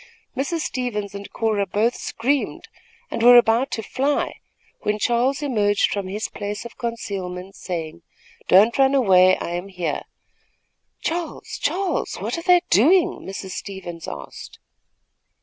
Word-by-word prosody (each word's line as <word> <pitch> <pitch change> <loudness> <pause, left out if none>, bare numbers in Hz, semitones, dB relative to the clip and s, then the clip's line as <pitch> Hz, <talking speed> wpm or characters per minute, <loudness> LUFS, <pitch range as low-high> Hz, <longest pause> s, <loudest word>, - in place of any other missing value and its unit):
Mrs. 315 +5 -1
Stevens 215 -8 -3
and 200 0 -8
Cora 215 -3 0
both 220 +6 +1
screamed, 270 +5 -2 0.4
and - - -3
were 245 +1 +9
about 240 +3 +4
to 225 - -3
fly, 275 +6 -1 0.4
when 210 0 -1
Charles 245 +6 +1
emerged 210 -7 +2
from 200 -2 -2
his 205 +3 -3
place 205 +2 -5
of 235 - -9
concealment, 195 -5 -5
saying: 170 -2 -5 0.5
"Don't 215 +7 +5
run 270 0 +5
away, 185 -7 +5
I - - -5
am 175 +2 -4
here." 180 -6 -3 1.0
"Charles! 335 0 -4
Charles! 380 -1 -1
what - - -3
were 335 - -4
they 355 0 +5
doing?" 325 - +4
Mrs. 190 0 -7
Stevens 175 -5 -7
asked. 70 -1 -8
215 Hz, 135 wpm, -22 LUFS, 190-260 Hz, 1.0 s, were